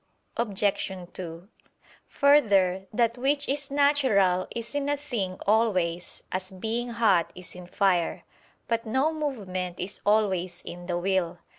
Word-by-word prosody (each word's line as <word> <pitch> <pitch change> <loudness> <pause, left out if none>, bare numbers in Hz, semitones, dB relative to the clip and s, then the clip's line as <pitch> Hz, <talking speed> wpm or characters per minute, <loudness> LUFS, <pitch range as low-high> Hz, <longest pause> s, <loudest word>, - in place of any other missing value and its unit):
Obj. 205 -3 0 0.2
2: 170 0 -7 0.6
Further, 200 -10 +4
that 235 +2 +1
which 285 +2 +1
is 280 +1 0
natural 260 -11 +3
is 235 +2 -6
in 285 0 -1
a 290 - +1
thing 230 -11 -3
always: 185 -6 +1
as 185 0 -3
"being 225 +6 -3
hot" 220 -8 +2
is 180 -1 -7
in 180 -1 -10
fire. 180 -3 +1 0.4
But 230 0 -1
no 265 +8 +2
movement 190 - -3
is 190 +3 -5
always 190 -4 +1
in 175 0 -8
the 175 -1 -1
will. 180 -1 0
200 Hz, 135 wpm, -27 LUFS, 185-245 Hz, 0.6 s, Further